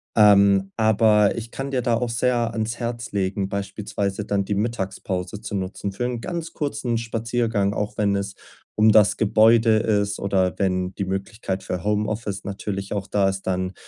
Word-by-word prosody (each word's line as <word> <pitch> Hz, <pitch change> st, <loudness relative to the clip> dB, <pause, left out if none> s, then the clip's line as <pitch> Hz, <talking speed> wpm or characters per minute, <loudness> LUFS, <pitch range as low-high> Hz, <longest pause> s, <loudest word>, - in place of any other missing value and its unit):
Ähm, 100 Hz, -2 st, +5 dB
aber 110 Hz, -2 st, +3 dB
ich 115 Hz, 0 st, -6 dB
kann 135 Hz, +1 st, -5 dB
dir 130 Hz, -2 st, 0 dB
da 120 Hz, -1 st, +1 dB
auch 120 Hz, +1 st, -1 dB
sehr 120 Hz, 0 st, +1 dB
ans 115 Hz, +1 st, -3 dB
Herz 120 Hz, 0 st, -4 dB
legen, 95 Hz, 0 st, -1 dB
beispielsweise 100 Hz, 0 st, -3 dB
dann 100 Hz, -1 st, 0 dB
die 100 Hz, +1 st, -2 dB
Mittagspause 100 Hz, -3 st, -3 dB
zu 105 Hz, -2 st, -5 dB
nutzen 95 Hz, +1 st, -3 dB
für 120 Hz, +5 st, -3 dB
'n 125 Hz, -1 st, -2 dB
ganz 170 Hz, +1 st, -5 dB
kurzen 130 Hz, -5 st, -2 dB
Spaziergang, 115 Hz, -2 st, -1 dB
auch 105 Hz, 0 st, -3 dB
wenn 100 Hz, -1 st, +2 dB
es 100 Hz, 0 st, -3 dB, 0.4 s
um 110 Hz, +1 st, +5 dB
das 105 Hz, -2 st, +5 dB
Gebäude 110 Hz, +1 st, +4 dB
ist, 105 Hz, -2 st, 0 dB
oder 95 Hz, -3 st, 0 dB
wenn 90 Hz, -1 st, -1 dB
die 100 Hz, -, -2 dB
Möglichkeit 95 Hz, 0 st, -4 dB
für 90 Hz, -3 st, -4 dB
Homeoffice 105 Hz, -1 st, -2 dB
natürlich 100 Hz, 0 st, -4 dB
auch 100 Hz, -1 st, -3 dB
da 100 Hz, -1 st, +2 dB
ist, 95 Hz, 0 st, -4 dB
dann 95 Hz, 0 st, -1 dB
105 Hz, 175 wpm, -23 LUFS, 100-115 Hz, 0.4 s, Ähm